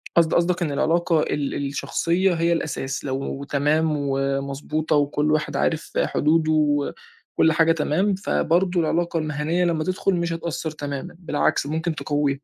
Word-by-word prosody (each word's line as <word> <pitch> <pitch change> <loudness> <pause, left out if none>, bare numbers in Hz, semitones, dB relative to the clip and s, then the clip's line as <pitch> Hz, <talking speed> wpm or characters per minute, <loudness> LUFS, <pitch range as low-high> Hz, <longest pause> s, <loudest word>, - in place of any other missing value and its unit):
قصد 165 -2 +4
قصدك 175 +1 +2
إن 160 -4 0
العلاقة 165 +2 +2
ال 145 -2 -2
الشخصية 175 +6 0
هي 170 0 +1
الأساس، 135 -4 -3
لو 135 +1 -3
تمام 150 +3 +1
ومضبوطة 140 +2 -1
وكُلّ 145 +1 +1
واحد 155 0 0
عارف 165 0 -1
حدوده، 155 +1 +2
وكُلّ 150 +1 0
حاجة 165 0 +4
تمام، 165 +5 +1
فبرضه 180 -1 +1
العلاقة 170 +1 0
المهنيّة 155 +3 -1
لمّا 165 -2 0
تدخُل 185 +2 0
مش 170 -1 -1
هتأثّر 165 -1 -4
تمامًا، 145 +3 -6
بالعكس 150 -4 0
ممكن 160 +2 -2
تقوِّيها. 145 -2 0
155 Hz, 140 wpm, -23 LUFS, 145-170 Hz, -, قصد